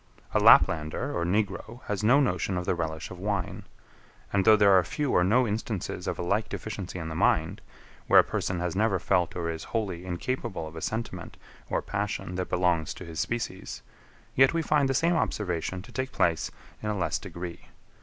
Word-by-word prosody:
A - - +4
Laplander 80 -5 +4
or 85 - 0
Negro 105 +5 -2
has 105 0 -3
no 125 +6 +6
notion 95 - 0
of 90 - -3
the - - +1
relish 80 -2 -4
of 90 - -8
wine. 100 -2 -3 0.7
And 100 -1 +2
though 110 -1 +8
there 100 -1 +5
are 90 - +5
few 145 - -2
or 90 - +4
no 120 +7 +3
instances 105 -2 -3
of - - -2
a - - -3
like 100 +5 0
deficiency 100 -4 -5
in 80 -2 -5
the 80 - -4
mind, 85 +4 +1 0.5
where - - +8
a - - +7
person 90 -2 -2
has 90 -1 -2
never 105 -1 +2
felt 90 0 +1
or 85 -1 -2
is 80 - -6
wholly 95 -6 -3
incapable 95 0 -3
of 80 +1 -9
a 80 - -6
sentiment 110 +6 -4 0.3
or - - -1
passion 100 -3 -3
that 90 0 -3
belongs 90 -3 +1
to 90 - -9
his 80 -2 -7
species; 115 -5 -3 0.5
yet 135 +5 +5
we 165 - +1
find 145 -3 +2
the 135 - +1
same 170 +6 +3
observation 90 - -2
to 120 - -14
take 130 +1 -3
place 85 -2 +1 0.3
in 105 - -3
a 105 - -1
less 90 - 0
degree. 85 -1 -8
95 Hz, 200 wpm, -28 LUFS, 85-110 Hz, 0.7 s, though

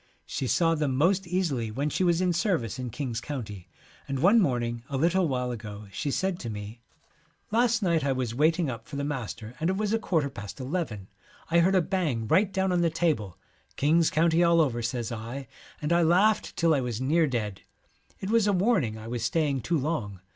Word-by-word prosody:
She 130 - -3
saw 165 +5 +3
them 150 -4 0
most 180 +6 +2
easily 165 -11 -1
when 140 +7 -2
she 185 - 0
was 175 -1 +2
in 180 -1 +2
service 170 - -1
in 125 -1 -4
King's 115 -2 -4
County, 105 -10 -6 0.4
and 135 -1 -2
one 190 - +5
morning 120 - 0
a 140 - -2
little 175 +5 +2
while 125 -3 -1
ago 105 -3 -8
she 140 - -3
said 185 +5 -1
to 115 - -5
me, 105 +2 -7 0.7
1 225 +3 +3
Last 235 -2 +2
night 170 -4 +2
I 140 - +1
was 130 -3 -2
waiting 160 +5 +2
up 115 -3 -6
for 145 - -8
the 140 - -2
master 120 -5 -5
and 165 +2 0
it 190 - 0
was 210 0 0
a 225 - +2
quarter 160 -9 0
past 105 0 -8
eleven. 130 - -3 0.4
I 170 - +5
heard 185 +3 +3
a 185 - +4
bang 155 - -1
right 195 - +3
down 190 -1 0
on 175 -1 +2
the 170 - +3
table. 155 - -1 0.2
" - - -35
King's 160 +3 +3
County 165 +2 +3
all 170 0 +4
over," 125 -7 +1
says 120 0 -3
I, 120 +4 -6 0.4
and 150 +3 +1
I 170 - +4
laughed 185 +6 +3
till 165 -1 +3
I 140 - +2
was 120 -3 -3
near 155 +5 +2
dead. 105 -7 -3 0.6
It 190 - -4
was 225 -2 +3
a 205 - +3
warning 180 - +1
I 110 0 -9
was 120 -1 -3
staying 145 0 0
too 170 +5 0
long. 130 - -3
150 Hz, 220 wpm, -27 LUFS, 120-175 Hz, 0.7 s, one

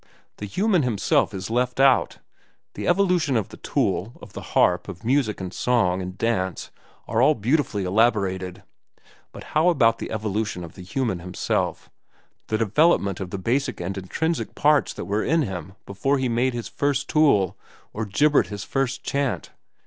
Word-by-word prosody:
The 105 - -6
human 190 - +2
himself 120 -7 +1
is 95 +2 -6
left 125 +2 0
out. 135 -1 +4 0.6
The - - -5
evolution 180 -9 +2
of 105 - -2
the - - -11
tool, - - -1
of - - -13
the - - -7 0.2
harp, 90 -1 +3
of 95 +2 -9
music 125 -4 +1
and 95 -1 -6
song 95 -7 +1
and 90 +1 -6
dance, 95 -6 -1 0.4
are 115 +2 +1
all 150 +4 +5
beautifully 115 -3 0
elaborated; 95 -2 0 0.7
but - - -10
how 160 +3 +4
about 115 -9 +3
the - - -5
evolution 105 -3 -2
of 85 - -9
the - - -11
human 95 +1 -2
himself, 90 +1 -2 0.6
the 110 - 0
development 110 - +2
of 95 - -5
the 100 - -4
basic 120 +9 -1
and 95 +2 -4
intrinsic 160 - -2
parts 150 -1 +3
that - - -6
were 105 +2 -1
in 160 +2 +2
him 95 - -6
before 135 +9 0
he 130 -1 0
made 120 +2 0
his 120 - -4
first 140 -1 -1
tool 105 - +3 0.4
or 110 - -3
gibbered 145 +9 +3
his 100 -1 -6
first 135 +4 -2
chant? 140 -1 -2
115 Hz, 170 wpm, -24 LUFS, 95-140 Hz, 0.7 s, all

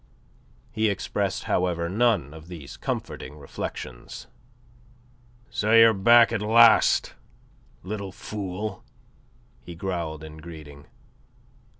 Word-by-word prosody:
He 110 0 +1
expressed, 100 - -2
however, 85 -2 0
none 100 - +1
of 80 +1 -12
these 80 -6 -9
comforting 70 +4 -5
reflections. 65 -3 -7 1.3
"So 105 +1 0
you're 115 0 +8
back 115 +4 +5
at 115 -3 -1
last, 115 +1 +5 0.7
little 100 0 -5
fool," 100 +1 -6 0.8
he 85 - -10
growled 85 -4 -4
in 80 0 -10
greeting. 75 -3 -12
90 Hz, 95 wpm, -25 LUFS, 80-110 Hz, 1.3 s, you're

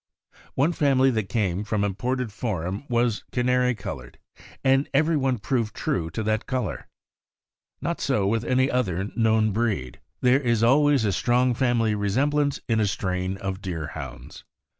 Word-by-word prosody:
One 145 +6 +2
family 135 -4 +3
that 110 -5 -2
came 100 -3 0
from 105 -1 -1
Imported 120 +4 -2
Forum 100 - -3
was 120 -2 +1
canary 125 0 +2
colored, 80 - -8 0.5
and 135 +1 +3
every 160 +3 +3
one 135 -3 +1
proved 115 0 -2
true 80 -3 -1
to 110 - -4
that 110 +1 -1
color. 125 - -3 0.9
Not - - -2
so 100 - +1
with 110 +3 +1
any 130 +3 +2
other 100 -6 -1
known 110 -2 +3
breed. 100 - -2 0.2
There 125 +2 +4
is 120 -4 +1
always 140 0 +4
a 100 - +2
strong 125 +4 +2
family 120 -3 +1
resemblance 140 +8 +1
in 115 -2 +1
a 105 - +2
strain 95 0 -2
of 95 0 -4
Deerhounds. 80 -7 -7
115 Hz, 150 wpm, -25 LUFS, 100-125 Hz, 0.9 s, There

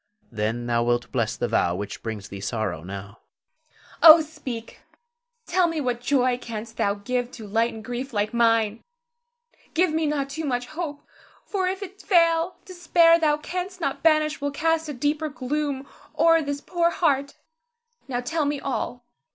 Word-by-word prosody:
Then 115 +2 -2
thou 120 -1 +1
wilt 120 0 0
bless 115 -3 -1
the 120 - -1
vow 85 -5 +1
which 100 +2 -6
brings 110 -3 -6
thee 100 - -7
sorrow 100 -9 -3
now. 100 +3 -8
Zara. 315 0 -29 0.2
Oh, 335 - +1
speak! 275 -7 -7 0.7
Tell 365 -2 +2
me 330 -1 -2
what 245 -4 -1
joy 250 -1 +2
canst 225 -1 -7
thou 200 0 +1
give 245 +4 -2
to 225 - -9
lighten 225 +1 -1
grief 245 +4 -5
like 210 -1 -1
mine! 230 -2 +2 0.9
Give 340 -1 +3
me 320 -1 +1
not 280 -2 -1
too 320 +3 -4
much 245 -4 -1
hope; 310 0 -6 0.4
for 380 -3 -1
if 380 +2 -2
it 395 +1 -10
fail, 335 -2 +3
despair 340 -2 +4
thou 300 -2 +3
canst 365 +4 -5
not 275 -5 -2
banish 310 -2 +3
will 285 - 0
cast 320 +2 0
a - - -3
deeper 295 +4 -1
gloom 280 0 -3 0.3
o'er 330 +1 +5
this 285 -1 -3
poor 340 0 +1
heart. 280 -5 0 0.7
Now, 245 -2 -2
tell 300 +5 -1
me 290 0 -1
all. 245 -2 -4
275 Hz, 165 wpm, -24 LUFS, 220-320 Hz, 0.9 s, o'er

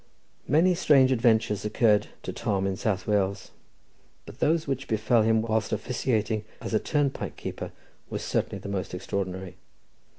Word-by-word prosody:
Many 165 +7 +4
strange 140 -6 +4
adventures 110 -4 +2
occurred 105 -1 +3 0.2
to 95 - -4
Tom 100 -2 -1
in 95 -1 0
South 100 -3 -1
Wales, 100 -2 0 0.7
but - - -12
those 160 +1 +2
which 135 -1 -3
befell 110 +1 +2
him 110 0 +3
whilst 110 -1 0
officiating 110 -1 -1 0.2
as - - -6
a 110 - +4
turnpike 145 +1 -1
keeper - - -6 0.4
were - - -3
certainly - - -1
the - - -8
most 95 -2 -3
extraordinary. 95 -1 -4
110 Hz, 145 wpm, -27 LUFS, 100-125 Hz, 0.7 s, Many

